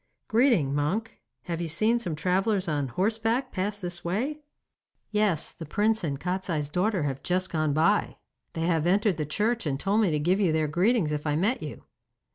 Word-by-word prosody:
'Greeting, 220 - +3
monk. 185 +11 -2 0.2
Have 170 -1 -4
you 170 - -2
seen 215 +9 +2
some 175 -9 -3
travellers 190 +4 0
on 145 -4 -1
horseback 225 - 0
pass 200 +2 -2
this 175 -3 -4
way?' 245 - -2 0.7
'Yes, 210 -6 +1
the - - -10
prince 215 +4 +1
and 140 -4 -2
Kostiei's 180 -5 -2
daughter 185 +1 +1
have 135 -2 -3
just 185 +1 -1
gone 155 -2 0
by. 165 +8 +2 0.4
They 165 - -4
have 165 -1 +1
entered 195 -1 +2
the 150 -2 -2
church, 215 +5 0
and 135 -1 -1
told 200 +5 +2
me 205 - +3
to 155 - +1
give 175 +6 +1
you 190 -5 +3
their 155 -1 +1
greetings 180 +2 +2
if 150 +1 -3
I 150 - +1
met 205 - +1
you. - - -7
180 Hz, 190 wpm, -27 LUFS, 155-215 Hz, 0.7 s, Greeting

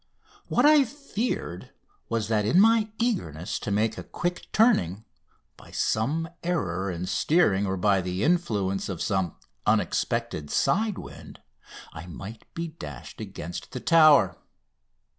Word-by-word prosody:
What - - +2
I 300 -1 +7
feared 255 -3 -4 0.4
was 110 -2 -1
that 110 -2 +1
in 115 - +3
my 220 +1 +5
eagerness 130 - -2
to - - -5
make 110 +2 0
a - - -6
quick 175 0 -4
turning, 110 - +2 0.5
by - - -15
some 145 +10 0
error 100 - -1
in 90 0 -4
steering 100 - +2
or 95 0 -1
by 95 0 +3
the 90 +2 -3
influence 105 - 0
of 90 -4 -4
some 95 -7 -1 0.3
unexpected 75 -1 0
side 215 0 +1
wind, - - -10 0.5
I 85 +2 -9
might 100 +5 -10
be 170 0 -3
dashed 75 - -9
against 85 +2 -7
the 125 - -3
Tower. 155 - +5
110 Hz, 135 wpm, -26 LUFS, -, 0.5 s, I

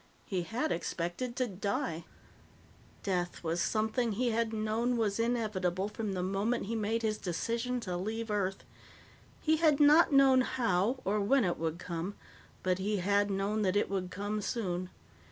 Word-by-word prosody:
He 185 -3 -1
had 245 - -2
expected 175 +9 -3
to 255 - +1
die. 195 -5 -3 1.0
Death 180 -3 -2
was 165 +1 0
something 220 +1 0
he 240 +3 +1
had 225 0 0
known 225 +3 0
was 215 -2 0
inevitable 210 -5 0
from 210 -1 -3
the 180 -1 -2
moment 200 +5 0
he 230 +3 -3
made 225 +1 -1
his 215 -1 0
decision 230 +7 -2
to 185 -5 -3
leave 220 +4 -3
Earth. 195 -2 -1 0.8
He 315 0 +3
had 310 -3 +4
not 300 +3 +6
known 270 -2 +6
how 235 -1 +1
or 210 +2 +1
when 250 +4 +3
it 175 - -1
would 165 0 -2
come, 175 +3 -4 0.5
but 185 0 +1
he 205 +2 0
had 200 +2 +2
known 200 +2 0
that 190 -2 +1
it 205 - +1
would 185 -2 -2
come 205 +3 -3
soon. 185 -4 -2
210 Hz, 165 wpm, -32 LUFS, 185-230 Hz, 1.0 s, not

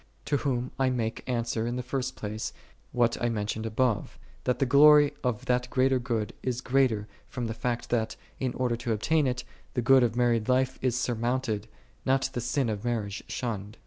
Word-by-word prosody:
To 145 - +1
whom 125 -3 -1
I 130 -1 +3
make 115 -3 -2
answer 115 -2 -1
in 120 - -2
the 125 - -3
first 130 +1 -3
place, 110 +1 -4 0.4
what 120 -1 +1
I 120 - +2
mentioned 110 0 -2
above, 115 -1 0 0.3
that 125 - +1
the 135 - +2
glory 145 +2 +7
of 125 -4 -1
that 125 0 +1
greater 130 0 +3
good 115 -4 -2
is 125 -2 -2
greater 130 -5 +1 0.2
from 125 -3 -4
the 115 - -2
fact 120 +1 -3
that, 115 -2 0 0.2
in 130 -2 -1
order 125 -2 0
to 120 -1 -1
obtain 150 +7 +2
it, 125 -1 -2 0.3
the 125 - +1
good 135 +2 +6
of 120 -2 +1
married 120 -2 +2
life 130 0 +2
is 125 -2 +1
surmounted, 120 -3 -1 0.4
not 135 0 +1
the 120 - -2
sin 125 +2 0
of 105 -2 -3
marriage 110 -5 -2
shunned. 105 -3 -4
120 Hz, 190 wpm, -28 LUFS, 115-130 Hz, 0.4 s, glory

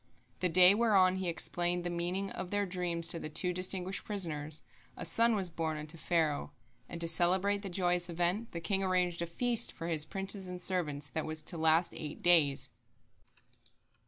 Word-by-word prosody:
The 180 - +1
day 180 +2 +8
whereon 200 -4 +3
he 185 -2 -2
explained 175 +1 0
the 175 - -3
meaning 180 +3 -3
of 180 - -6
their 205 +1 0
dreams 175 -2 -2
to 170 - +1
the 155 - -6
two 180 +4 +3
distinguished 185 +1 -1
prisoners, 160 -7 -2 0.3
a - - -6
son 230 0 +3
was 195 -3 0
born 160 -1 -3
unto 150 +2 -6
Pharaoh 160 -3 -1 0.4
and 170 - -7
to 165 - -2
celebrate 185 +4 +1
the 200 - -5
joyous 175 -1 0
event, 175 +7 -1
the 170 - -6
king 195 +2 0
arranged 180 -2 0
a 170 - -2
feast 235 +7 -1
for 165 - -7
his 155 -2 -1
princes 195 0 -2
and 180 0 -6
servants 155 -6 -2
that 160 +2 -4
was 155 0 -3
to 170 - -4
last 160 +1 +2
eight 150 -1 -8
days. 160 -6 +3
175 Hz, 185 wpm, -32 LUFS, 165-190 Hz, 0.4 s, day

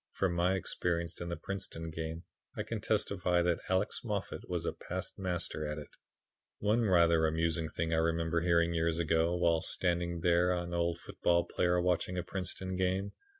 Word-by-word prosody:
From 95 -3 +1
my 90 +2 +2
experience 85 -2 -2
in 85 - -4
the 85 - -3
Princeton 95 -4 -5
game 80 +1 -5 0.3
I - - -1
can - - -4
testify 90 -3 +1
that 85 -1 +1
Alex 95 +3 +1
Moffat 105 -5 -4
was - - -2
a - - -1
past - - -6
master 90 -4 -2
at 75 0 -3
it. 75 - -8 0.7
"One 110 +3 +2
rather 85 -4 +5
amusing 80 0 0
thing 80 +1 -2
I - - +3
remember 80 0 +1
hearing 85 -1 +3
years 80 0 +1
ago 80 +1 +2
while 85 -2 +3
standing 85 0 0
with 85 - -6
an 85 0 +2
old 85 0 +1
football 85 0 +1
player 90 0 +1
watching 90 0 0
a 90 - -1
Princeton 95 0 -4
game. 95 +2 0
85 Hz, 175 wpm, -32 LUFS, 85-90 Hz, 0.7 s, rather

